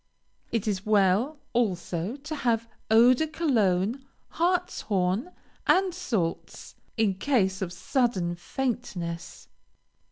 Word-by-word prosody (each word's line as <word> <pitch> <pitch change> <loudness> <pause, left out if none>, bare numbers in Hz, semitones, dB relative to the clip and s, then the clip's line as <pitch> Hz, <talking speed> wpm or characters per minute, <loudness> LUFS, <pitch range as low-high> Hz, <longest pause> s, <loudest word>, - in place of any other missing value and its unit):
It 225 -2 -1
is 195 -2 -1
well, 210 +7 +3 0.2
also, 190 -3 -1
to 295 +2 -6
have 230 -4 0 0.2
Eau 230 +3 +7
de 315 +5 0
Cologne, 240 - +1 0.3
hartshorn, 325 - 0 0.4
and 375 -1 +4
salts, 225 - -3 0.2
in 215 -3 +3
case 195 -3 +1
of 180 -2 -2
sudden 190 -3 0
faintness. 175 -4 -4
225 Hz, 100 wpm, -27 LUFS, 185-270 Hz, 0.4 s, Eau